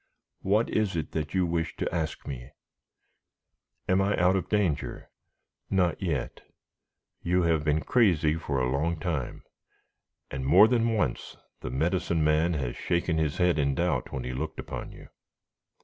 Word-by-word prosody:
What 105 +4 +2
is 105 -4 0
it 80 - -3
that 75 +2 -3
you 95 -1 +3
wish 85 -1 -2
to - - -3
ask 80 -2 -3
me?" 60 -2 -6 1.4
"Am 95 +1 +3
I 100 +1 +1
out 90 +2 +4
of 95 - -2
danger?" 100 -9 -1 0.6
"Not 90 -3 +1
yet. 80 -9 -2 0.8
You 90 +1 +1
have 80 -3 +2
been 75 0 +1
crazy 90 -11 +3
for 75 -4 -2
a 65 0 0
long 80 +4 0
time, 75 -7 -3 0.9
and 65 0 -4
more 70 +11 +7
than 115 -1 +2
once 90 - -2 0.2
the - - -5
Medicine 80 +4 0
Man 80 +3 +2
has 65 -5 -3
shaken 85 -1 0
his 75 -2 -1
head 90 -3 +2
in 70 -2 +1
doubt 90 +5 -1
when 65 - -4
he 65 +1 -4
looked 80 +4 -4
upon - - -6
you." - - -13
80 Hz, 160 wpm, -28 LUFS, 75-90 Hz, 1.4 s, more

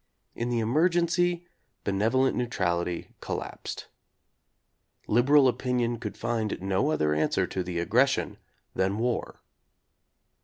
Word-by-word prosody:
In 120 +1 -3
the 120 - 0
emergency 175 +6 +2 0.4
be 100 - -1
nevolent 115 +7 +2
neutrality 90 -8 -1
collapsed. - - -5 1.2
Liberal 135 +5 +5
opinion 125 -2 0
could 105 -3 -6
find 115 -2 -2
no 95 +8 0
other 75 - +1
answer 75 +1 +1
to 95 - -3
the 90 -1 -4
aggression 120 +11 +1 0.3
than 95 +2 0
war. 120 +1 -2
120 Hz, 110 wpm, -27 LUFS, 95-135 Hz, 1.2 s, Liberal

